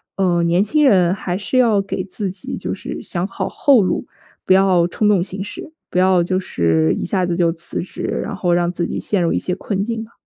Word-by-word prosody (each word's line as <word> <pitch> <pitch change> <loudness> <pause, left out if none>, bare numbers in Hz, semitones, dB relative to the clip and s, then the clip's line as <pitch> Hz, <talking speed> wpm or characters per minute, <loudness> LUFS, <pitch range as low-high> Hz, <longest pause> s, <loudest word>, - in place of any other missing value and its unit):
呃， 180 -3 +1
年 170 +3 +3
轻 295 +8 +2
人 180 -5 +4
还 185 -2 -3
是 210 +5 -2
要 225 -5 +4
给 195 - -4
自 195 0 -4
己 190 - -5
就 - - -4
是 - - -6
想 175 0 -2
好 - - -4
后 270 -6 +4
路， 185 - -1 0.4
不 185 - +4
要 185 -3 +4
冲 210 +4 0
动 195 -4 +3
行 190 +1 -4
事， 315 +9 -9 0.2
不 - - -4
要 185 -2 +4
就 185 +1 0
是 80 - +1
一 - - -3
下 185 0 0
子 175 -1 -1
就 170 -2 +2
辞 165 0 -5
职， 180 - -7 0.2
然 - - -5
后 175 -1 +1
让 175 0 +1
自 175 -1 -2
己 - - -4
陷 200 -4 0
入 170 - +1
一 - - +1
些 180 - -2
困 195 +1 -2
境 230 0 -3
嘛。 225 +1 -10
185 Hz, 255 characters per minute, -19 LUFS, 175-200 Hz, 0.4 s, 人